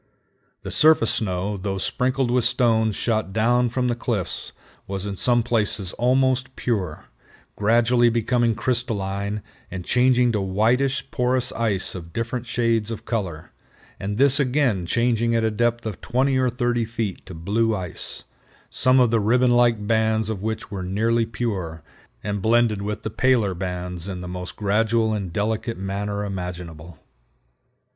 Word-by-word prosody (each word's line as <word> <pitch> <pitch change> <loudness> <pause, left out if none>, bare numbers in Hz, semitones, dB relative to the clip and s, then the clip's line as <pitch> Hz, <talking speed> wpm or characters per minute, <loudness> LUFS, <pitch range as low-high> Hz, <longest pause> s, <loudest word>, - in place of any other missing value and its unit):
The - - -5
surface 155 -7 +4
snow, 100 0 -2
though 95 0 -3
sprinkled 125 +5 0
with 125 -1 +2
stones 115 -3 +2
shot 110 -4 -1
down 120 +4 +2
from 125 +1 -1
the 120 - +1
cliffs, 115 -5 -3 0.4
was 95 0 -4
in 100 -1 -3
some 120 +3 +2
places 105 -5 0
almost 130 +1 +1
pure, 95 -10 -2 0.5
gradually 120 +3 +3
becoming 115 0 +1
crystalline 105 -5 -2 0.3
and 90 -1 -6
changing 125 -1 +3
to 105 -3 0
whitish 115 +8 +1
porous 125 0 +1
ice 105 -5 -1
of 85 -2 -9
different 120 +1 -3
shades 115 -2 +1
of 110 -1 -6
color, 95 -9 -4 0.5
and 100 +1 -3
this 140 +2 +4
again 125 - +1
changing 115 +1 +1
at 115 - +2
a 110 - +1
depth 120 +2 0
of 110 -4 -5
20 130 +3 +1
or 130 -1 +2
30 120 -1 0
feet 110 -3 -4
to 95 - -8
blue 110 +7 0
ice, 90 -4 -5 0.5
some 130 +1 +4
of 125 -3 +4
the 115 - +3
ribbon 120 +4 +3
like 120 -3 +3
bands 110 0 +1
of 105 -4 -3
which 110 +1 -4
were 100 -2 -4
nearly 110 +5 +1
pure, 95 -10 -4 0.4
and 100 -1 -2
blended 115 -1 +2
with 105 +1 -4
the 110 - -3
paler 120 -5 +2
bands 90 -1 -4
in 95 -2 -5
the 90 - -6
most 90 0 -6
gradual 110 +2 +1
and 100 -4 -3
delicate 110 +4 -2
manner 100 +2 -3
imaginable. 90 -4 -6
110 Hz, 155 wpm, -23 LUFS, 100-120 Hz, 0.5 s, surface